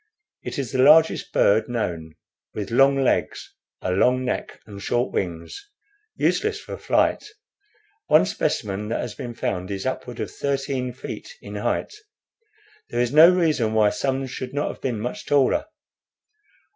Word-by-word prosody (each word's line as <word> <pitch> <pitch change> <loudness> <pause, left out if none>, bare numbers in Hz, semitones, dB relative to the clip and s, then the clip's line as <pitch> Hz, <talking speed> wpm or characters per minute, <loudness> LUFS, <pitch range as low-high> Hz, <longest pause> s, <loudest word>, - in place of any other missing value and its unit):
It - - -6
is 135 -5 -3
the 130 - -2
largest 155 +4 +5
bird 110 +3 +3
known, 85 -9 -3 0.4
with 105 -1 -4
long 135 +3 +5
legs, - - -1 0.3
a 90 - -1
long 125 +7 +2
neck, 125 - -3
and 100 -2 -10
short 120 +4 -1
wings, 90 - -4 0.5
useless 430 0 0
for - - -8
flight. - - +1 0.8
One - - +5
specimen 105 0 -2
that 115 - -2
has 120 -3 -5
been 120 -1 -7
found 90 -3 -3
is 95 -1 -4
upward 125 -2 -4
of - - -4
thirteen 135 -2 -2
feet 305 - -8
in - - -10
height. - - -2 1.0
There - - -2
is 120 +1 0
no 160 +3 +9
reason 155 -11 +1
why 105 -1 +4
some 135 0 -1
should 130 +1 -7
not 145 - 0
have - - -9
been 120 -5 -2
much 120 +3 -5
taller. 140 -2 +2
125 Hz, 155 wpm, -23 LUFS, 105-140 Hz, 1.0 s, no